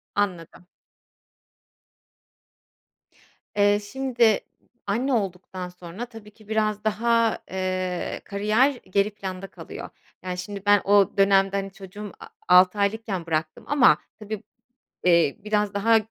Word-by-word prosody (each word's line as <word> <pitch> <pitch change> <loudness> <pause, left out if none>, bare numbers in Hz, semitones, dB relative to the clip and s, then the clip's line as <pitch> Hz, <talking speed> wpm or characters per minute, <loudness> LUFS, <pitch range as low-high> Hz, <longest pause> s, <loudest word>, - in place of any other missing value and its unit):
Anladım. 180 -4 -2 2.9
Eee, 205 0 +4
şimdi 235 0 +1 0.5
anne 245 +7 0
olduktan 185 -3 -3
sonra 180 +5 -8
tabii 225 -3 -13
ki 215 0 -20
biraz 215 -1 0
daha, 230 +1 +2
eee, 185 -1 -2
kariyer 215 +6 +2 0.2
geri 200 +2 +2
planda 195 -2 -6
kalıyor. - - -9 0.3
Yani, 180 -1 -4
şimdi 195 +2 -6
ben 205 -1 +5
o 205 0 +4
dönemde, 195 0 +4
hani, 195 0 -3
çocuğum 200 +1 -9
a - - -10 0.2
altı 180 +3 +6
aylıkken 200 -3 -1
bıraktım 155 -1 -2
ama 280 -3 +5 0.2
tabii, 215 -1 -6 0.6
eee, 170 -5 +4
biraz 210 -1 0
daha 225 +3 +4
200 Hz, 115 wpm, -25 LUFS, 185-215 Hz, 2.9 s, altı